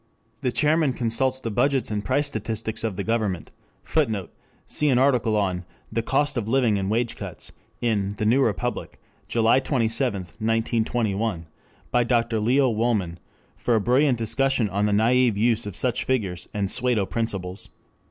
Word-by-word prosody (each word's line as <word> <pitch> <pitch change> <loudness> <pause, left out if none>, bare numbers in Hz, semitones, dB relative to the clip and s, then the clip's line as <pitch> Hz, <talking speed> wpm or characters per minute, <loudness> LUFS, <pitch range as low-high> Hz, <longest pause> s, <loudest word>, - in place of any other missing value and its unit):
The 125 - 0
chairman 150 +2 +2
consults 125 +2 0
the 115 -3 -4
budgets 135 +2 +1
and 105 -1 -2
price 145 +8 +1
statistics 110 -4 -3
of 110 -4 -2
the 100 - -3
government. 110 -6 -1 0.3
[Footnote: 110 - -1 0.3
See 150 - +2
an 130 - +3
article 125 -5 +3
on 95 -3 -1 0.3
"The 115 - 0
Cost 140 +3 0
of 110 -3 -2
Living 115 -4 +2
and 95 0 -2
Wage 115 +2 0
Cuts," - - -7 0.3
in 105 -4 0
the 105 - -1
New 120 +6 +4
Republic, 105 -10 -2 0.3
July 115 +2 +3
27, 120 -5 0
1921, 110 0 -1 0.5
by 125 - +3
Dr. 115 -2 +1
Leo 130 +5 +3
Wolman, 105 -7 0 0.4
for 120 - 0
a - - +3
brilliant 125 +4 +3
discussion 125 +1 +1
of 100 +2 0
the - - 0
naive 115 +1 +3
use 110 -1 +2
of 100 - -5
such 125 -2 0
figures 100 -10 -2
and 100 -2 -2
"pseudo 125 -5 +1
principles." 95 -4 -4
115 Hz, 160 wpm, -24 LUFS, 105-125 Hz, 0.5 s, New